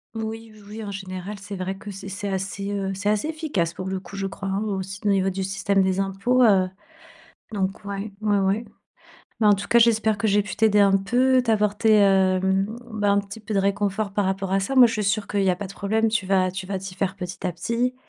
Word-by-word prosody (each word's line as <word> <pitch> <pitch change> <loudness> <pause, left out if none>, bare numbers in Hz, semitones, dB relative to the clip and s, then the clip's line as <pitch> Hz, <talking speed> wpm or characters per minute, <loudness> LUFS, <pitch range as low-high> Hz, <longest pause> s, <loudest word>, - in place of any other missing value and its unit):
Oui, 225 0 -5
oui, 215 -1 -17
oui, 220 +2 -7
en 205 - -6
général, 190 0 -6
c'est 200 +1 -8
vrai 185 +1 -3
que 205 +1 -8
c'est 195 0 -8
c'est 200 +1 -4
assez, 195 +1 -3
heu, 195 -1 -2
c'est 205 +2 -1
assez 210 +7 0
efficace 295 - -2
pour 185 - -5
le 190 0 -2
coup, 185 +1 -12
je 195 0 -3
crois 195 0 -5
hein, 195 +2 -1
aussi 195 -1 -4
au - - +3
niveau 195 -1 +2
du 190 0 -3
système 195 0 +1
des 190 0 0
impôts, 195 +6 +1
heu, 195 -5 +5 0.8
donc 195 0 -3
ouais, 200 +1 -5
ouais, 210 -1 +2
ouais. 195 +4 0 0.7
Mais 220 - +2
en 210 - +7
tout 195 - -6
cas, 235 - +5
j'espère 220 -2 +3
que 220 - 0
j'ai 205 0 +3
pu 205 - -7
t'aider 215 -2 +4
un 195 -1 +5
peu, 250 +6 +3
t'apporter, 215 -2 +3
heu, 190 -1 +4 0.5
bah, 205 -2 +1
un 200 - +3
petit 200 +1 -10
peu 215 0 -6
de 195 - +3
réconfort 200 +1 -1
par 205 0 0
rapport 195 0 -2
à 195 - +3
ça. 195 +8 -2
Moi, 255 -2 +8
je - - -3
suis 210 - -1
sûre 200 +1 0
qu'il 200 -1 0
y 190 - +4
a 180 - 0
pas 200 +2 -5
de - - -9
problème, 220 +3 0
tu 215 -3 -1
vas 185 -1 +2
tu 185 0 -6
vas 195 0 -3
t'y 190 -1 -8
faire 190 -1 -1
petit 180 -1 -6
à 180 - -1
petit. 235 +9 -1
200 Hz, 250 wpm, -24 LUFS, 195-215 Hz, 0.8 s, Moi